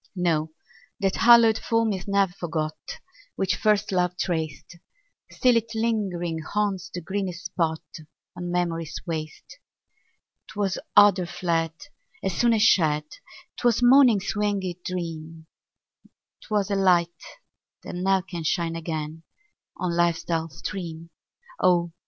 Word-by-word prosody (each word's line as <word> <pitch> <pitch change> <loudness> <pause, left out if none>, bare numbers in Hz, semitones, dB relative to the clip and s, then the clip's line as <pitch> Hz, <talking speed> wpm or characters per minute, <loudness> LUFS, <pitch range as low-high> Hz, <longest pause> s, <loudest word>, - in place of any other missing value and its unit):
No, 160 -3 0 0.5
that 195 -2 0
hallowed 230 -2 +6
form 230 -2 +1
is 185 -1 -6
ne'er 200 -1 +2
forgot 160 -3 -3 0.6
Which 190 -1 0
first 210 -1 +1
love 180 -1 0
traced; 170 0 -3 0.5
Still 250 -2 +2
it 230 0 -3
lingering 195 -7 -1
haunts 195 +1 -2
the 175 - -5
greenest 185 0 -4
spot 165 -2 -1 0.5
On 175 0 -5
memory's 165 -3 -2
waste. 160 - -6 0.9
'Twas 200 -2 -2 0.2
odor 200 -3 +6
fled 165 -2 -1 0.5
As 190 -2 -1
soon 235 -1 +3
as 215 - +2
shed; 155 -8 +4 0.5
'Twas 240 -1 +2
morning's 245 -6 +5
winged 205 -2 0 0.2
dream; 165 -3 -6 1.0
'Twas 205 -2 -1
a - - +2
light, 175 -3 +2 0.6
that - - -7
ne'er 190 +1 +1
can 175 -3 -6
shine 165 +1 -1
again 160 -1 -5 0.6
On 175 -2 -2
life's 170 -1 +1
dull 165 -1 -2
stream: 165 0 -7 0.5
Oh! 175 -1 +3
180 Hz, 120 wpm, -25 LUFS, 165-205 Hz, 1.0 s, hallowed